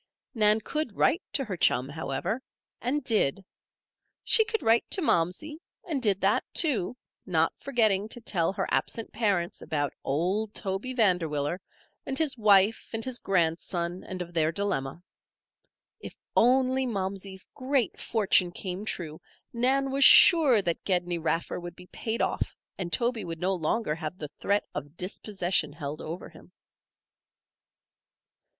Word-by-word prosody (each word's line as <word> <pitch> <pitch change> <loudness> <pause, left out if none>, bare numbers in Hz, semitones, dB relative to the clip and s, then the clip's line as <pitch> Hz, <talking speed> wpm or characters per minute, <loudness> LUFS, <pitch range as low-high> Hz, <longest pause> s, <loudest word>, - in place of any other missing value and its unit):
Nan 215 -2 +4
could 300 -4 -3
write 340 - +3
to 275 - 0
her 200 -5 -4
chum, 130 -6 +2
however, 160 - -3 0.4
and 280 +5 -1
did. 195 - +1 0.8
She 445 - +5
could 445 0 -3
write 225 +1 +3
to - - +3
Momsey, 295 - 0 0.3
and 300 -6 -2
did 205 -5 +2
that, 195 +2 +2
too; 250 - +3 0.3
not 165 -3 +1
forgetting 220 -6 +1
to 240 - -4
tell 180 -7 0
her 195 -1 -2
absent 230 - -2
parents 195 -5 0
about 145 -2 -2
old 190 +10 -1
Toby 200 +6 -3
Vanderwiller, 175 - +1 0.4
and 270 - -3
his 315 -5 +1
wife 210 -1 +3
and 225 0 -3
his 255 -2 -1
grandson, 175 0 -1
and 185 -1 -5
of 175 0 -14
their 160 -1 +2
dilemma. 165 -5 -3 1.0
If - - -10 0.2
only 260 +2 +3
Momsey's 190 -2 -3
great 260 -4 -1
fortune 195 -5 +2
came 185 +2 -5
true, 160 -7 -5 0.3
Nan 265 +3 +1
was 275 +1 +2
sure 270 - +7
that 170 -2 -2
Gedney 175 -2 0
Raffer 165 +2 -2
would 175 -1 -8
be 180 - -13
paid 220 +5 -3
off - - -2 0.2
and 175 -3 -5
Toby 235 0 0
would 165 -1 -6
no 185 +2 0
longer 175 +1 -1
have 160 +2 -6
the 150 -4 -6
threat 200 +1 +1
of 145 +2 -7
dispossession 180 -4 -1
held 150 -1 -6
over 165 +3 -6
him. - - -17
195 Hz, 145 wpm, -27 LUFS, 170-235 Hz, 1.0 s, sure